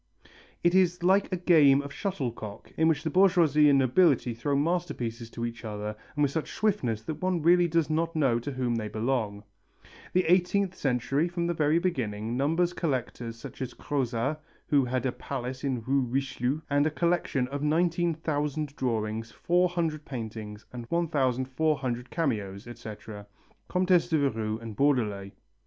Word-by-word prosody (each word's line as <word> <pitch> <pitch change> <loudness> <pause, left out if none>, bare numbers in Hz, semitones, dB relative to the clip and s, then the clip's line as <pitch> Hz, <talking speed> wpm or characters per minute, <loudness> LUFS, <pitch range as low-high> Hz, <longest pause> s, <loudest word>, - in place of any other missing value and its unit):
_) - - -20 0.4
"It 175 0 +4
is 180 -2 +3
like 195 +3 +3
a 185 - 0
game 155 -6 +5
of 140 0 -8
shuttlecock 120 - -4
in 160 - +3
which 160 -2 +1
the 160 - -2
bourgeoisie 170 -6 +5
and 140 - +5
nobility 135 -2 +3
throw 140 +5 -1
masterpieces 140 -8 -1
to 115 0 -4
each 115 -1 -6
other 105 -1 -4 0.2
and 150 - +2
with 140 - +2
such 160 +1 -3
swiftness 130 - 0
that 155 +4 -5
one 180 -3 0
really 175 +1 +5
does 165 -2 +1
not 165 +1 -1
know 135 -7 +2
to 145 +5 -5
whom 125 -2 -1
they 110 -1 -3
belong." 110 -2 -2 0.7
The 185 - +3
eighteenth 185 +2 +2
century, 135 +1 0
from 175 0 -2
the 175 - 0
very 155 0 +2
beginning, 115 - -2
numbers 165 +6 +1
collectors 125 -7 -3
such 115 - -10
as 125 -1 -4
Crozat, 135 +1 -1 0.3
who 140 -2 +3
had 130 +1 -1
a 130 - +1
palace 130 0 -5
in 130 -5 -1
Rue 135 +3 +2
Richelieu 130 +2 -1
and 145 +1 +2
a - - +2
collection 165 -5 0
of 140 +1 -4
19,000 155 -2 0
drawings, 110 -3 -2
400 170 - 0
paintings 110 -5 -7
and 120 -2 -7
1400 130 -4 0
cameos, 105 - -2
etc., 110 -3 -9 0.4
Comtesse 180 -2 +3
de 160 - +3
Verrue 110 -6 0
and 115 -2 -8
Baudelet. 105 -8 +1
140 Hz, 160 wpm, -28 LUFS, 120-165 Hz, 0.7 s, game